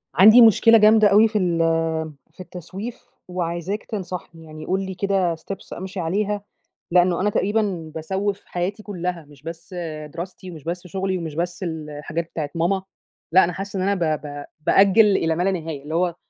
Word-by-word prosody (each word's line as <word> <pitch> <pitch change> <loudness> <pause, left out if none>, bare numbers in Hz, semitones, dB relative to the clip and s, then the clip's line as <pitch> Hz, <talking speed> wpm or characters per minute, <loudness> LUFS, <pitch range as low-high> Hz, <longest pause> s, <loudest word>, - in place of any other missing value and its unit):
عندي 215 +8 +9
مشكلة 225 0 +7
جامدة 215 0 +6
أوي 210 +3 +6
في 215 -1 -2
ال 175 -4 +1 0.8
في - - -31
التسويف 185 +6 -8 0.2
وعايزاك 180 +3 -3
تنصحني. 180 -5 -6
يعني 155 0 -10
قُل 190 +3 -1
لي 190 - -5
كده 190 -3 +1
steps 195 +4 -8
أمشي 190 +1 -6
عليها، 200 +5 -1 0.5
لأنّه 180 0 +3
أنا 205 - +2
تقريبًا 195 -6 -1
باسوِّف 195 +5 -2
حياتي 190 +4 -3
كُلّها، 180 -5 -4
مش 145 -2 -18
بس 165 +4 -9 0.4
دراستي 185 +1 -7
ومش 155 -4 -11
بس 175 +2 -5
شُغلي 190 +1 -2
ومش 160 -4 -6
بس 175 +3 -3
الحاجات 160 0 -5
بتاعة 150 -3 -3
ماما، 180 +3 +1 0.5
لأ 185 +3 +7
أنا 175 - -1
حاسّة 195 +2 -5
إن - - 0
أنا 200 - +2 0.2
ب 150 - -10
ب 145 0 -7 0.2
بأجِّل 200 +3 +6
إلى 165 0 0
ما 175 - 0
لا 195 - +2
نهاية، 160 -6 -5
اللي 155 +2 -5
هو 175 0 +1
180 Hz, 175 wpm, -22 LUFS, 165-195 Hz, 0.8 s, عندي